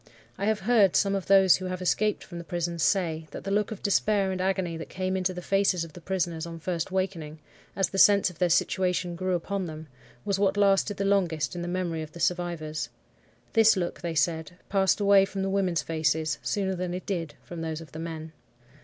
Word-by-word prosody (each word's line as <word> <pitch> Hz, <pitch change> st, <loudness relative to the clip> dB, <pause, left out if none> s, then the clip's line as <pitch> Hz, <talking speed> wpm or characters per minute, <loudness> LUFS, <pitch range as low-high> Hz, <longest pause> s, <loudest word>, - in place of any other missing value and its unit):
(I 200 Hz, -, -3 dB
have 215 Hz, -1 st, +1 dB
heard 210 Hz, -3 st, +4 dB
some 195 Hz, -1 st, +3 dB
of 195 Hz, -2 st, -2 dB
those 190 Hz, -2 st, +6 dB
who 185 Hz, -, -6 dB
have 185 Hz, 0 st, -3 dB
escaped 205 Hz, +3 st, 0 dB
from 175 Hz, -2 st, -9 dB
the -, -, -7 dB
prisons 170 Hz, 0 st, -3 dB
say, 160 Hz, -3 st, +1 dB
that -, -, -8 dB
the 195 Hz, -, -4 dB
look 210 Hz, 0 st, +1 dB
of 220 Hz, -, -8 dB
despair 200 Hz, -1 st, +2 dB
and 185 Hz, -1 st, -3 dB
agony 185 Hz, -3 st, 0 dB
that 165 Hz, -, -8 dB
came 185 Hz, 0 st, -2 dB
into 185 Hz, 0 st, 0 dB
the 180 Hz, -1 st, -7 dB
faces 195 Hz, -3 st, +2 dB
of 165 Hz, -, -9 dB
the 175 Hz, -, -11 dB
prisoners 170 Hz, -2 st, -2 dB
on 165 Hz, 0 st, -7 dB
first 170 Hz, +1 st, -3 dB
wakening, 180 Hz, -5 st, -2 dB, 0.4 s
as 195 Hz, -2 st, +1 dB
the 195 Hz, -, -2 dB
sense 200 Hz, -2 st, +6 dB
of 165 Hz, -, -19 dB
their 180 Hz, -, +2 dB
situation 180 Hz, +1 st, +1 dB
grew 185 Hz, +1 st, -1 dB
upon 190 Hz, +2 st, -3 dB
them, 155 Hz, 0 st, -8 dB, 0.4 s
was 195 Hz, -1 st, 0 dB
what 200 Hz, 0 st, +2 dB
lasted 200 Hz, 0 st, +3 dB
the 200 Hz, -, -1 dB
longest 175 Hz, -6 st, +1 dB
in 175 Hz, -, -4 dB
the 175 Hz, -, -4 dB
memory 175 Hz, -2 st, -2 dB
of 155 Hz, -1 st, -8 dB
the 170 Hz, -, -10 dB
survivors. 170 Hz, -3 st, -2 dB, 0.6 s
This 225 Hz, -2 st, +5 dB
look, 175 Hz, -2 st, -3 dB
they 170 Hz, -2 st, -3 dB
said, 160 Hz, 0 st, 0 dB, 0.2 s
passed 190 Hz, -3 st, +2 dB
away 200 Hz, -1 st, +6 dB
from 195 Hz, 0 st, -3 dB
the 195 Hz, -, -1 dB
women's 185 Hz, -5 st, +1 dB
faces 160 Hz, -1 st, 0 dB
sooner 195 Hz, -2 st, -1 dB
than 180 Hz, -1 st, -3 dB
it 185 Hz, -, -6 dB
did 170 Hz, -6 st, -3 dB
from 170 Hz, -2 st, -7 dB
those 160 Hz, -1 st, -3 dB
of 165 Hz, -, -12 dB
the 155 Hz, -, -8 dB
men.) 160 Hz, -1 st, -6 dB
180 Hz, 225 wpm, -27 LUFS, 165-195 Hz, 0.6 s, those